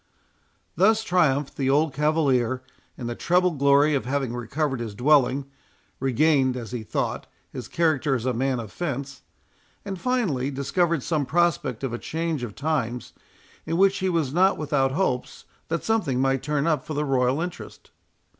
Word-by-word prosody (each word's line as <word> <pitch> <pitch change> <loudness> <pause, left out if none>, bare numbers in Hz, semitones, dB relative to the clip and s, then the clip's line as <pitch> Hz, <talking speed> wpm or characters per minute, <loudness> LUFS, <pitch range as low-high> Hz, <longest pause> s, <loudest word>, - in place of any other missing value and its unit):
Thus 215 +6 +4
triumphed 150 -8 +1
the 135 -1 0
old 150 +1 +2
cavalier, 135 -5 +1 0.3
in 125 - -6
the 120 - -2
treble 180 +7 +2
glory 140 0 +4
of 140 - 0
having 135 -2 -1
recovered 135 +3 -2
his 110 -3 -5
dwelling,—regained, 135 0 +1
as 115 -3 -7
he 125 -2 -4
thought, 110 - -3 0.2
his - - -7
character 155 -4 +1
as 120 -1 -3
a 130 - +1
man 130 +1 0
of 110 -3 -7
fence, 140 -5 -4 0.6
and 195 -3 -5
finally, 195 - 0
discovered 150 +3 0
some 150 -5 -1
prospect 160 -7 0
of 130 -3 -2
a 120 - -3
change 160 -3 -3
of 115 -5 -6
times, 130 -5 -2 0.5
in 165 +1 -1
which 195 +1 +4
he 190 - 0
was 160 -6 0
not 190 +3 +3
without 140 -3 +1
hopes 135 -7 -2 0.2
that 165 0 -2
something 180 - 0
might 135 0 +1
turn 150 0 -1
up 155 -5 +1
for 155 - -6
the 150 +1 0
royal 130 0 +1
interest. 175 +1 -7
140 Hz, 165 wpm, -25 LUFS, 130-165 Hz, 0.6 s, Thus